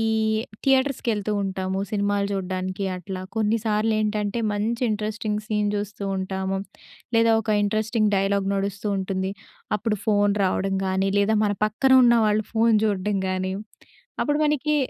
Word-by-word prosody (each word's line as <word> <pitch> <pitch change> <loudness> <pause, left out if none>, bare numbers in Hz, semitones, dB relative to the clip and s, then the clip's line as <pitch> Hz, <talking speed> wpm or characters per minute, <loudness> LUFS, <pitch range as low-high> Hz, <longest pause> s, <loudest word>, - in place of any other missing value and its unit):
ఈ - - +1 0.6
థియేటర్స్‌కి 270 -2 +2
ఎళ్తూ 210 +1 -2
ఉంటాము 190 0 -2
సినిమాలు 205 -1 0
జూడ్డానికి 185 0 -3
అట్లా. 185 +1 -6
కొన్నిసార్లేంటంటే 215 0 0
మంచి 220 +4 -1
ఇంట్రెస్టింగ్ 215 0 -2
సీన్ 210 -1 0
జూస్తూ 205 0 -5
ఉంటాము 190 0 -2 0.6
లేదా, 230 0 +5
ఒక 220 - -12
ఇంట్రెస్టింగ్ 215 +1 +1
డైలాగ్ 195 0 +1
నడుస్తూ 200 +1 -3
ఉంటుంది. 190 0 -2 0.4
అప్పుడు 210 -1 -2
ఫోన్ 205 -1 +3
రావడం 195 +1 0
గానీ 190 +1 +1
లేదా 210 +2 +3
మన 205 - +1
పక్కన 260 +5 +1
ఉన్న 235 0 +6
వాళ్ళు 210 +1 +1
ఫోన్ 225 -1 +4
జూడ్డం 205 -1 0
గాని, 185 0 -1 0.7
అప్పుడు 295 0 +1
మనకి 300 0 +1
205 Hz, 135 wpm, -24 LUFS, 195-220 Hz, 0.7 s, ఉన్న